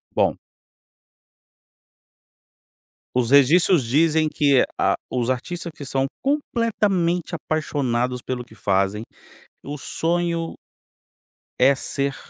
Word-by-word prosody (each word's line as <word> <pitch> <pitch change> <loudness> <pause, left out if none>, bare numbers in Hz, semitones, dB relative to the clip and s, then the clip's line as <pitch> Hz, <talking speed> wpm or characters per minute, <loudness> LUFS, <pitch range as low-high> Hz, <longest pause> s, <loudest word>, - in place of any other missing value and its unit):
Bom. - - +2 2.8
Os 125 0 +1
registros 155 +3 +5
dizem 155 +5 +2
que 140 -4 +3 0.2
a, - - +3 0.2
os 125 -1 -1
artistas 170 +7 -3
que 150 - -9
são 135 0 0 0.2
completamente 210 - 0
apaixonados 130 -6 -1
pelo 125 0 -4
que - - -18
fazem, 100 0 0 0.6
o 145 +1 -5
sonho 170 +2 -2 1.1
é 135 +2 +6
ser 140 +1 -2
145 Hz, 95 wpm, -22 LUFS, 125-170 Hz, 2.8 s, é